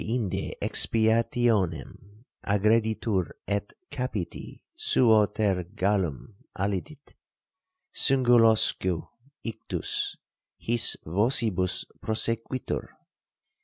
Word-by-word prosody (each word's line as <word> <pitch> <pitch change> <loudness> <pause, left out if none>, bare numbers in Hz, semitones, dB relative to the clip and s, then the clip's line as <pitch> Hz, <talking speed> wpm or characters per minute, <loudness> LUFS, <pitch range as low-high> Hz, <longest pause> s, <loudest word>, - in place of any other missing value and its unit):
Deinde 110 -4 -2
expiationem 110 - 0 0.2
aggreditur 105 -2 +1
et 100 0 -2 0.2
capiti 110 -9 -5
suo 110 -4 +4
ter 100 -4 0
gallum 95 - -1 0.2
allidit, 100 - -4 0.8
singulosque 115 - +3 0.3
ictus 115 -3 -3 0.4
his 120 0 +1
vocibus 100 0 +1 0.2
prosequitur. 115 +3 -2
110 Hz, 60 wpm, -27 LUFS, 95-115 Hz, 0.8 s, suo